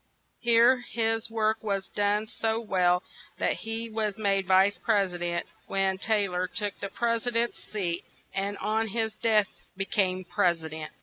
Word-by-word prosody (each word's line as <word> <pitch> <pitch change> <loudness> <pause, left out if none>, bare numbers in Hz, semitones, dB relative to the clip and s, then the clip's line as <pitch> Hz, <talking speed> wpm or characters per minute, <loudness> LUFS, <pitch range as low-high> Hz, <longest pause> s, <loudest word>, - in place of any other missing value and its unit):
Here 235 +2 +5
his 225 -2 -1
work 220 -1 0
was 200 -2 -1
done 205 +1 +1
so 225 +1 -1
well 180 -5 +2 0.3
that - - 0
he 225 +1 -4
was 215 -2 -2
made 195 -3 +1
vice 190 +2 +4
pres 200 -5 +2
i - - -4
dent, 175 0 -2 0.2
when 190 -1 0
Tay 210 -1 +1
lor 180 0 -1
took 205 +1 -3
the 200 - -4
pres 230 +3 -1
i - - +5
dent's 235 0 0
seat; 180 -5 -3 0.3
and 200 +1 -1
on 220 +2 0
his 220 +1 -1
death 215 -2 +2 0.3
be 195 - -1
came 185 -2 0
pres 175 -4 +1
i - - -5
dent. 155 0 -7
205 Hz, 180 wpm, -28 LUFS, 190-225 Hz, 0.3 s, Here